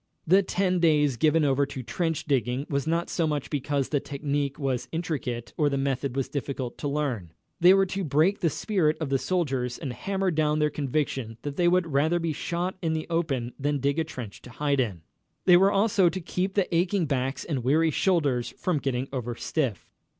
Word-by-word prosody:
The 190 +4 +5
ten 185 -1 0
days 150 -5 +3
given 155 +5 +3
over 140 0 +2
to 135 -2 -6
trench 165 +4 -2
digging 130 -1 0
was 140 +1 -1
not 170 +1 0
so 165 -2 0
much 150 -3 -2
because 145 -1 -1
the 145 - +1
technic 140 0 -2
was 135 -4 -2
intricate 135 -8 -3
or 150 -2 +3
the 140 - -1
method 135 -1 -1 0.2
difficult 135 -3 -4
to 145 - -2
learn. 130 - -2 0.3
They 180 +2 +7
were 195 0 +4
to 195 +1 -3
break 160 +6 +2
the 165 - +2
spirit 165 -3 0
of 155 -4 -3
the 135 -1 +1
soldiers 135 -9 -1
and 135 -6 -5
hammer 195 +6 -1
down 155 -1 +1
their 150 -1 +2
conviction 135 -5 -2
that 145 -1 -4
they 175 +2 +2
would 180 0 +3
rather 155 +5 +3
be 165 -2 -1
shot 175 +5 -3
in 165 -2 0
the 160 0 -2
open 135 -8 -1
than 145 +1 0
dig 140 +3 0
a - - +2
trench 130 -10 -8
to - - -12
hide 140 +2 0
in. 100 -10 -1 0.4
They 180 - +7
were 195 +3 +5
also 195 -3 +3
to 185 - -4
keep 185 +2 -2
the 195 -4 +1
aching 180 +1 +2
backs 135 -1 -2
and 140 -7 -2
weary 155 +5 +3
shoulders 145 -9 +1
from 175 -5 0
getting 130 -2 -1
overstiff. 120 0 -2
150 Hz, 200 wpm, -26 LUFS, 135-170 Hz, 0.4 s, They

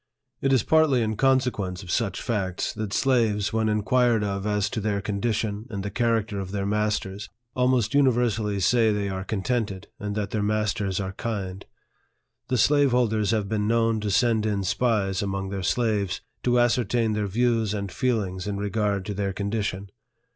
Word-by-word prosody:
It 135 - +1
is 130 -5 +4
partly 155 -6 +3
in 110 0 -1
consequence 120 -8 +1
of 90 - -6
such 110 -1 -1
facts, 95 -6 -2
that 110 -2 -4
slaves, 110 -5 +1
when 110 -1 +1
inquired 115 +1 +2
of 100 0 -2
as 105 -1 +1
to 110 - -2
their 100 -1 0
condition 105 +1 -2
and 100 -3 -4
the 100 - -4
charac 115 -2 +1
ter 100 -3 -4
of 95 -1 -5
their 100 0 -2
masters, 105 -1 -1 0.3
almost 125 -2 +2
universally 120 -7 +2
say 110 +3 +4
they 100 -1 -1
are 95 -1 -3
contented, 105 -1 -2
and 105 0 -4
that 105 -2 -2
their 110 - -1
masters 105 -2 0
are 95 -1 -3
kind. 95 -3 -4 0.8
The 130 - 0
slave 145 +4 +4
holders 110 -4 +1
have 110 -3 +1
been 105 0 -1
known 115 -1 +2
to 105 -1 -2
send 110 +1 +2
in 100 -2 -1
spies 100 -1 +1
among 95 -1 -3
their 100 -1 -4
slaves, 105 -1 0 0.2
to 125 0 +2
ascertain 120 -2 +2
their 105 -1 -1
views 115 0 +1
and 100 -2 -4
feelings 105 -7 -1
in 100 -1 -2
regard 100 -1 -1
to 105 - -3
their 100 -1 -2
condition. 100 -1 -3
105 Hz, 175 wpm, -25 LUFS, 100-115 Hz, 0.8 s, is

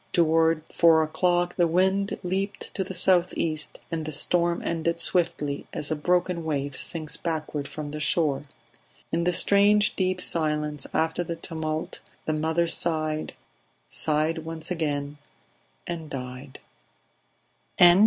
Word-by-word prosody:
Toward 165 -1 +3
four 165 -2 +5
o'clock 175 +2 0
the 175 -2 +4
wind 190 +4 +1
leaped 195 +3 -3
to 190 - -1
the 190 0 -7
south 180 0 +3
east, 155 -2 -2
and 165 -1 -2
the 155 - -5
storm 170 +3 +1
ended 170 0 -1
swiftly 165 -6 0
as 150 - -2
a - - +2
broken 175 +2 0
wave 145 -3 -2
sinks 155 0 0
backward 155 -3 -3
from 150 -1 -6
the 150 - -5
shore; 150 -2 +1 0.7
in 170 +1 0
the 180 - +3
strange 205 +3 +4
deep 185 -1 0
silence 150 -4 0
after 160 +2 0
the 170 0 -4
tumult 160 -1 -4 0.3
the 155 - 0
mother 160 +2 +1
sighed, 155 -2 0 0.6
sighed 155 +2 0
once 160 +1 -6
again, 145 -3 -2 0.7
and 165 -3 -5
died. 130 0 -7
160 Hz, 135 wpm, -26 LUFS, 155-175 Hz, 0.7 s, four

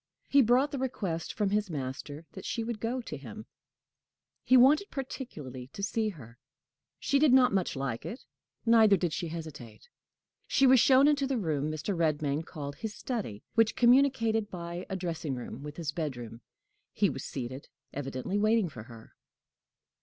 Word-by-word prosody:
He 280 - +5
brought 255 +4 +3
the 275 - -3
request 195 -11 -3
from 205 -2 -1
his 210 -1 0
master 145 +1 -5
that 190 - -9
she 230 - -2
would 230 -1 -4
go 240 +4 -2
to 155 -10 -7
him; 215 +10 -9 1.0
he 255 - +5
wanted 295 - +5
particularly 150 - -7
to 200 - -6
see 220 +1 0
her. 120 - -12 0.6
She 280 - +2
did 300 -2 +5
not 255 -3 +5
much 190 -5 0
like 135 -4 -3
it, 235 - -7 0.4
neither 220 -3 +6
did 175 -4 -1
she 170 - -3
hesitate. 155 - -9 0.6
She 270 - +3
was 260 -1 +7
shown 270 +3 +6
into 285 -2 +2
the 265 -1 0
room 155 -7 -1
Mr. 155 +6 -3
Redmain 155 -2 0
called 145 -4 -7
his 220 -1 -5
study, 205 - -4
which 225 -1 +3
communicated 235 -4 +3
by 175 -1 -6
a 190 - -2
dressing 165 -6 -3
room 125 +1 -7
with 150 +1 -8
his 160 -3 -3
bedroom. 125 -7 -5 0.5
He - - +3
was - - -4
seated, 130 +2 -6 0.3
evidently 135 +7 -3
waiting 215 -3 +3
for 120 - -9
her. 115 -2 -14
185 Hz, 170 wpm, -30 LUFS, 145-235 Hz, 1.0 s, was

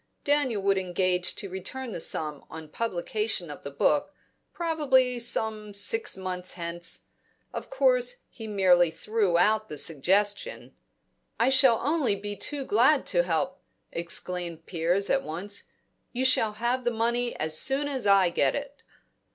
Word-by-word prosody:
Daniel 280 -8 +1
would 195 -1 +3
engage 180 -1 0
to 200 - -4
return 200 +7 -5
the - - -5
sum 150 -3 -1
on 160 -1 -9
publication 210 -1 -2
of - - -10
the 140 - -6
book, 145 - +1 0.4
probably 270 -7 +1
some 220 -3 -1
six 440 - 0
months 185 -1 -4
hence. 170 -1 -5 0.5
Of - - -6
course - - +2
he 225 -3 -9
merely 185 -4 +4
threw 200 +1 0
out 215 +3 +2
the 150 - -6
suggestion 200 - 0 0.7
"I 235 +3 +4
shall 265 -3 +6
be - - -7
only 210 -9 0
too 280 +5 -3
glad 260 +7 +3
to 175 - +4
help," 180 +2 -2 0.3
exclaimed 170 -1 -3
Piers 175 +3 0
at 270 - +3
once. 200 +2 -5 0.5
"You 255 +1 -1
shall 220 -4 +4
have 240 +4 -1
the 240 - +2
money 235 +1 -1
as 155 0 -1
soon 275 +2 +1
as 260 -7 -2
I 195 -3 +5
get - - +1
it." 285 0 -6
205 Hz, 150 wpm, -27 LUFS, 180-255 Hz, 0.7 s, shall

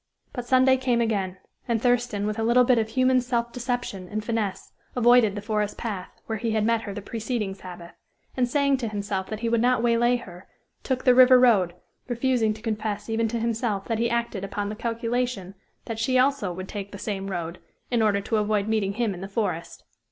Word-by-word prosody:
But 245 -2 -5
Sunday 260 +1 +5
came 255 -2 +1
again 200 -5 -1 0.3
and 235 -2 +1
Thurston, 240 -3 +1
with 215 +1 -2
a - - 0
little 240 +2 +5
bit 245 -1 +4
of 220 -1 -1
human 255 +1 +3
self 235 -1 -1
deception 245 -7 -3
and 215 0 -4
finesse, 220 -4 -2 0.2
avoided 240 -4 +5
the 205 - -5
forest 210 -1 -1
path, 200 -6 -4 0.2
where 220 -1 -3
he 225 -1 -1
had 215 -1 +1
met 230 0 +2
her 205 -3 -6
the 205 - -6
preceding 220 -2 -3
Sabbath, 175 -3 -10 0.4
and 245 -2 +1
saying 280 +1 +2
to 245 -3 -3
himself 200 -2 -3
that 215 0 -6
he 235 - -1
would 230 0 +2
not 245 -1 +2
waylay 240 +1 +3
her, 185 -6 -9 0.3
took 260 -2 -2
the 250 - +6
river 255 0 +8
road, 200 -9 +4 0.3
refusing 240 -2 +1
to 220 - -14
confess 215 -1 -3
even 225 0 +1
to 230 +1 -2
himself 225 -3 -1
that 225 -2 -2
he 235 0 +1
acted 235 -4 -2
upon 200 +1 -3
the 215 - -4
calculation 230 -3 -2 0.3
that 225 -1 -5
she 255 +3 +2
also 255 -6 +2
would 185 +2 -6
take 200 -1 -6
the 200 - -8
same 195 -1 -4
road, 170 -2 -4 0.3
in 240 -2 +2
order 205 -2 +2
to 220 +2 -1
avoid 210 -1 +1
meeting 215 -3 0
him 220 -1 -1
in 180 - -9
the 195 - -5
forest. 195 -5 -3
225 Hz, 210 wpm, -25 LUFS, 205-245 Hz, 0.4 s, river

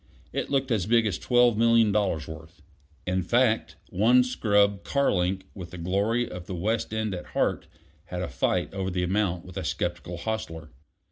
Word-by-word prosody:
It - - -2
looked 135 -1 0
as 105 -5 +1
big 115 0 +4
as 100 -5 -1
twelve 120 -2 +4
million 115 -2 +5
dollars' 95 -7 0
worth. 80 +1 -11 0.4
In 95 +1 0
fact, 115 +4 +1 0.2
one 120 +7 +5
scrub 100 -5 +2
car 140 0 +1
link, 95 +1 0
with 90 -4 -8
the 90 - -9
glory 100 +8 0
of 90 -1 -8
the 95 - -4
West 105 +6 -1
End 110 -2 -1
at 90 - -6
heart, - - 0 0.4
had 90 0 -4
a - - -2
fight 80 +9 -1
over 95 -1 -2
the 90 -1 -1
amount 90 -1 0
with 90 +1 -10
a 95 - -3
skeptical 85 0 -3
hostler. 85 -6 -5
100 Hz, 185 wpm, -26 LUFS, 90-115 Hz, 0.4 s, million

